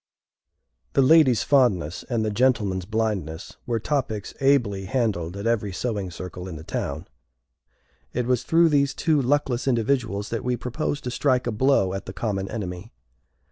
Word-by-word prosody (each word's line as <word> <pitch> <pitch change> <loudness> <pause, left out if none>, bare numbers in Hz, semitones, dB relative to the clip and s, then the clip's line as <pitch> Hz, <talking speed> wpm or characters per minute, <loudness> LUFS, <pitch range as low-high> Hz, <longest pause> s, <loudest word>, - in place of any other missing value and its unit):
The 135 - +4
lady's 135 -4 +5
fondness, 100 - +2
and 115 -3 0
the 110 - -1
gentleman's 105 -6 +1
blindness, 105 -6 -3
were 115 -2 0
topics 110 -5 -2
ably 120 -9 +2
handled 100 -7 -1
at 100 - -5
every 110 -3 0
sewing 100 -1 -3
circle 90 +1 -7
in 90 - -7
the 80 - -8
town. 80 +1 -4 1.0
It 125 - -1
was 125 -1 +1
through 165 +3 +4
these 140 -2 +2
two 155 -4 +2
luckless 135 -1 0
individuals 115 -4 0
that 115 - -3
we 125 0 0
proposed 145 +5 -3
to 125 - -3
strike 130 -1 +1
a 120 - -1
blow 110 -5 +2
at 95 - -5
the 95 - -6
common 100 -2 -2
enemy. 90 -6 -6
115 Hz, 160 wpm, -24 LUFS, 95-130 Hz, 1.0 s, lady's